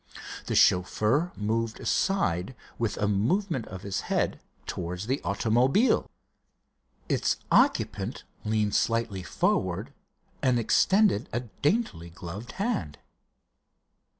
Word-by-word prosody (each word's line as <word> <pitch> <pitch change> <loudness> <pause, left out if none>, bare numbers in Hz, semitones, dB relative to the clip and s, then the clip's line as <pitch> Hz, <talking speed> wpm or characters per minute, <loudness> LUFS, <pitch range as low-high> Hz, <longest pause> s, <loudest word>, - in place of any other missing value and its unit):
The - - -1
chauffeur 110 - +3
moved 110 +2 -1
aside 130 - 0 0.2
with 115 -3 -1
a 105 - +1
movement 130 - 0
of 95 +1 -8
his 100 -1 -2
head - - 0 0.3
towards 90 +3 -4
the 135 +5 -1
automobile. 125 - +2 1.0
Its - - +1
occupant - - +2 0.2
leaned 105 -1 0
slightly 115 -5 0
forward, 90 - -1 0.5
and 125 -2 +3
extended 190 - +3
a 120 - -1 0.2
daintily 145 - 0
gloved 95 +6 -8
hand. 195 - -2
110 Hz, 100 wpm, -27 LUFS, 100-140 Hz, 1.0 s, chauffeur